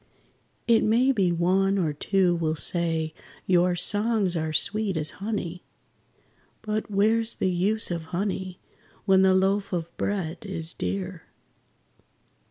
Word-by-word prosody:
It 230 -1 +4
may 240 +5 +3
be 195 -8 +1
one 190 +3 +1
or 160 -6 0
two 185 +4 +1
will 160 -2 -1
say 160 -1 +1 0.3
your 180 -1 +3
songs 205 0 +2
are 160 -1 -2
sweet 195 +3 0
as 155 0 +1
honey, 180 -5 -4 1.0
But 215 0 -3
where's 220 +3 +1
the 185 - 0
use 200 +4 0
of 170 -2 -4
honey, 185 +1 -4 0.5
when 190 -2 +4
the 190 0 +4
loaf 195 +1 +1
of 170 -1 -4
bread 185 -5 -3
is 170 -5 -5
dear? 95 +1 -5
185 Hz, 130 wpm, -25 LUFS, 170-205 Hz, 1.0 s, It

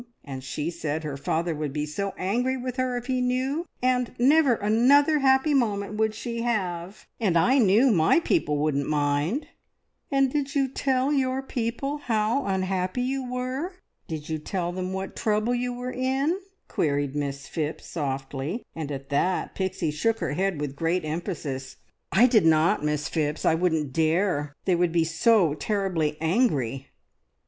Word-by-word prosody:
And 135 -2 -7
she 150 +4 -3
said 160 -2 -3
her 150 -2 -4
father 165 +4 -1
would 150 -2 -3
be 150 0 -1
so 195 +6 -4
angry 245 +8 0
with 255 0 -5
her 255 -1 0
if 245 - -5
he 255 0 0
knew, 260 +7 -1 0.2
that 250 -2 0
never 275 0 +5
another 270 +9 +4
happy 265 +2 +3
moment 210 -6 0
would 220 0 +1
she 235 +1 -4
have, 190 -5 -2
and 190 -7 +2
I 255 +12 +4
knew 230 +4 +5
my 170 - +4
people 325 - +1
wouldn't 145 -1 0
mind!" 150 - 0 0.6
"And 275 -2 +2
did 285 0 -1
you 275 -1 +3
tell 265 +1 0
your 265 -1 0
people 265 +4 -3
how 230 0 0
unhappy 190 +3 -1
you 260 -1 -2
were? 255 +8 -3 0.3
Did 155 -2 -5
you 160 -1 -2
tell 175 +2 -3
them 185 +1 -4
what 190 0 -4
trouble 215 +1 +1
you 245 0 -1
were 250 +1 -5
in?" 265 +5 0 0.3
queried 145 -2 0
Miss 140 -1 -3
Phipps 155 -1 -4
softly, 140 - -4
and 155 -3 -4
at 135 -1 -6
that 180 +6 0
Pixie 185 -4 -2
shook 225 +10 0
her 140 - -2
head 190 -1 0
with 145 -2 -4
great 165 +3 0
emphasis. 150 -5 -4 0.4
"I 225 +5 +6
did 220 -9 +4
not, 160 -1 +3
Miss 150 -1 0
Phipps 150 -2 -2
I - - +5
wouldn't 160 -5 0
dare! 160 -2 +1
They 185 - +3
would 175 -1 +2
be 170 -1 +3
so 165 +1 +3
terribly 170 -4 -1
angry!" 150 - +1
190 Hz, 165 wpm, -26 LUFS, 155-250 Hz, 0.6 s, I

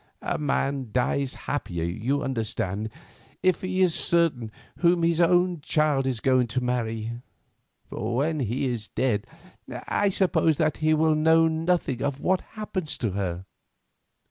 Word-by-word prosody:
A - - -1
man 140 -3 -1
dies 130 +2 0
happier, 90 - -3
you 115 - -1
understand, 110 -4 -2 0.5
if 185 -1 +2
he 185 0 +1
is 180 -3 +3
certain 155 -12 +1 0.3
whom 170 -1 +3
his 165 0 +2
only 175 +1 +3
child 145 -2 +1
is 125 -4 -1
going 130 -2 +3
to 125 +2 -2
marry; 115 -1 -2 0.7
for 115 +3 -3
when 155 +4 0
he 125 +2 -1
is 120 -4 -3
dead 115 -5 -1 0.4
I 205 - -1
suppose 180 -5 +2
that 155 -2 +1
he 155 0 +2
will 160 0 +3
know 160 +1 +4
nothing 160 -5 0
of 140 -1 -1
what 185 +3 +1 0.2
happens 185 -7 -3
to 115 -5 -1
her. 95 -2 -3
140 Hz, 145 wpm, -26 LUFS, 120-165 Hz, 0.7 s, know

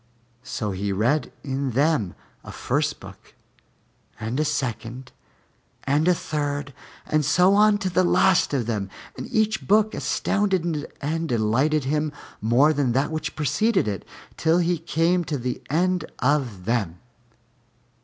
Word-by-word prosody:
So 120 -5 -4
he 100 +1 -2
read 120 +10 +1
in 135 -2 -2
them 140 - +1 0.3
a - - -9
first - - -1
book - - -14 0.8
and 110 +5 -3
a - - +3
second 130 -3 -3 0.7
and 145 +4 +1
a 180 - +5
third 145 -3 -3 0.3
and 155 0 +1
so 180 +7 +4
on 210 0 +5
to 200 - -3
the 185 +1 +3
last 185 +1 +3
of 135 -5 0
them, 105 -4 -2 0.3
and - - -7
each 220 0 0
book 215 +2 +4
astounded 180 -7 -1
and 160 +3 -2
delighted 125 +7 +2
him 150 +3 0 0.3
more 125 +8 +4
than 135 -5 +1
that 135 +5 +1
which 155 -1 -4
preceded 155 - +1
it, 100 -3 -3 0.3
till 160 +1 +3
he 175 -1 +1
came 170 +2 +1
to 150 -2 -2
the 125 0 -4
end 180 +3 +1
of 130 -9 0
them. 105 -7 -1
150 Hz, 145 wpm, -24 LUFS, 120-170 Hz, 0.8 s, a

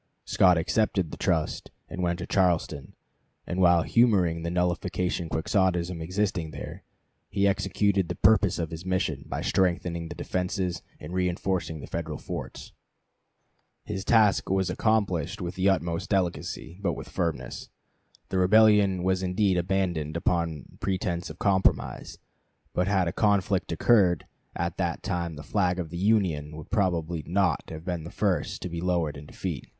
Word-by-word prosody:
Scott 90 -2 +4
accepted 90 -1 +1
the - - -5
trust 80 -3 -1 0.2
and 90 - -5
went 85 -1 0
to 85 - -5
Charleston, 85 -6 0 0.5
and 90 +1 -2
while 85 -2 +5
humoring 95 -9 +3
the 85 - -2
nullification 90 0 -1
Quixotism 90 +1 0
existing 90 -1 -1
there, - - -8 0.5
he 100 0 +2
executed 100 -1 +1
the - - -2
purpose 105 -4 +4
of 80 -2 -3
his 80 +1 -6
mission, 95 0 -1
by - - -3
strengthening 85 -2 0
the - - -7
defenses 90 -1 -2 0.2
and 85 - -8
reenforcing; 90 -3 -1
the - - -7
Federal 80 -3 -4
forts. - - -7 1.1
His 95 -3 -4
task 105 -2 +3
was 95 -1 +1
accomplished 95 -3 0
with 90 -2 -4
the 95 +1 +2
utmost 85 -3 -1
delicacy, 90 -2 -2
but 100 - 0
with - - -7
firmness. 75 -8 -3 0.6
The 95 - 0
rebellion 100 -1 +5
was 95 0 +1
indeed 95 +1 +1
abandoned 85 -4 -1
upon 85 -5 -1
pretense 90 -2 -2
of 80 - -9
compromise; 95 -1 +1 0.6
but 90 +1 +1
had 95 -3 +2
a 85 - -2
conflict 100 -4 +1
occurred 90 -1 +3 0.3
at 85 +1 -2
that 85 -3 -2
time 85 -4 -2
the 75 - -9
flag 90 -2 +1
of 85 -4 -4
the 85 - -5
Union 90 -7 +1
would 80 - -10
probably 85 -6 0
not 90 -2 +1
have 80 +1 -8
been 90 -3 -3
the 85 - -7
first 95 -6 -1
to - - -2
be 85 0 -4
lowered 85 -4 0
in 75 0 -10
defeat. - - -5
90 Hz, 155 wpm, -27 LUFS, 85-95 Hz, 1.1 s, while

